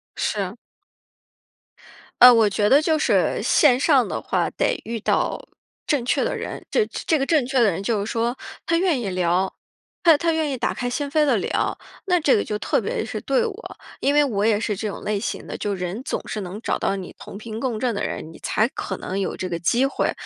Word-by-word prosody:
是。 - - -2 1.7
呃， 250 0 +11
我 225 -3 +4
觉 205 +1 +1
得 280 +5 +6
就 315 0 +2
是， 305 - +1
线 255 -5 +4
上 275 -3 +4
的 - - -3
话 - - -1
得 - - -1
遇 230 0 -4
到 - - -1 0.4
正 290 -6 +1
确 245 - +1
的 - - -1
人。 - - -6
这 460 - +3
这 315 - -1
个 270 - -1
正 305 -6 +3
确 260 +1 0
的 230 -3 +5
人 180 +3 -4
就 210 -1 0
是 210 - -4
说， 235 +1 0 0.3
他 335 - +1
愿 335 -6 +2
意 225 - -3
聊， 180 +1 0 0.5
他 330 -4 +7
他 335 +2 +1
愿 315 -2 0
意 265 - -3
打 - - -1
开 245 - -3
心 285 +4 -2
扉 305 0 +3
地 255 -6 +3
聊， - - -1 0.3
那 360 -1 +3
这 295 -4 +4
个 205 - +1
就 210 - -3
特 - - 0
别 - - -2
是 - - -5
对 475 - +1
我。 445 +1 -7 0.2
因 285 +1 +1
为 295 - +6
我 210 -7 -1
也 215 -2 +3
是 215 -1 -1
这 215 +3 -3
种 200 - -6
类 210 -1 -1
型 - - -4
的， - - -6
就 205 -1 -2
是 180 - -5
人 180 +6 -4
总 - - -2
是 215 - -4
能 190 +2 -6
找 - - -2
到 - - 0
你 190 -2 -7
同 195 - -9
频 220 0 -7
共 235 -3 -2
振 240 0 0
的 200 - -3
人， 160 - -5
你 - - -14
才 215 - +1
可 190 -7 -5
能 190 +2 -4
有 195 - -2
这 185 - -3
个 170 -2 -3
机 235 +9 +2
会， 275 - 0
235 Hz, 250 characters per minute, -23 LUFS, 205-290 Hz, 1.7 s, 呃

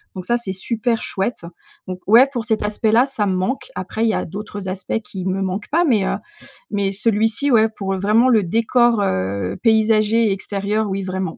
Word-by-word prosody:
donc 185 - -6
ça 240 +3 +1
c'est 195 -5 -5
super 230 +4 -2
chouette 195 -2 -3 0.4
donc 185 -1 -5
ouais, 235 +6 +7
pour 240 -4 -3
cet 220 -3 0
aspect 215 +1 0
là, 240 +3 +5
ça 230 -7 -2
me 190 - 0
manque. 215 - -2
Après 220 - -3
il 225 - +3
y - - +1
a - - -2
d'autres 205 +1 -7
aspects 190 +4 -3
qui 190 -3 -7
me 190 +1 -1
manquent 190 +2 -4
pas 335 +4 +2
mais 220 -9 +2
heu, - - 0 0.6
mais 200 -2 0
celui-ci, 225 +6 +1
ouais, 220 -1 +4
pour 195 -3 -4
vraiment 215 +5 +3
le 220 -4 +4
décor, 230 +3 +2
heu, 95 - -2
paysager 220 0 +3
et - - +1
extérieur, 200 +2 -2
oui, 195 0 -2
vraiment. 185 -2 -4
210 Hz, 205 wpm, -20 LUFS, 190-230 Hz, 0.6 s, ouais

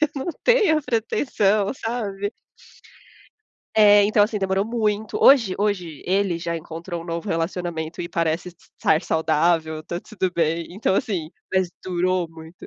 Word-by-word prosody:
eu 305 - +3
não 275 +4 -4 0.2
tenho 425 -11 +4
a - - -7
pretensão", 215 -4 +1
sabe. 210 -4 -3 1.4
É, 205 -1 +7
então 210 0 +4
assim 210 0 0
demorou 195 +1 0
muito 215 -2 -1
hoje 230 -9 +6
hoje 185 -7 -2
ele 190 -2 +1
já 170 0 -3
encontrou 165 +2 -6
um 165 - -9
novo 170 +3 -4
relacionamento 165 -2 -3
e 170 - -5
parece 165 0 -1
estar 165 -2 -1
saudável. 160 0 +1
Está 170 +2 -5
tudo 190 -2 -3
bem, 165 0 0
então 190 +1 0
assim, 175 -6 -1 0.2
mas 190 -2 +1
durou 185 0 0
muito. 160 +1 -13
185 Hz, 145 wpm, -23 LUFS, 165-210 Hz, 1.4 s, É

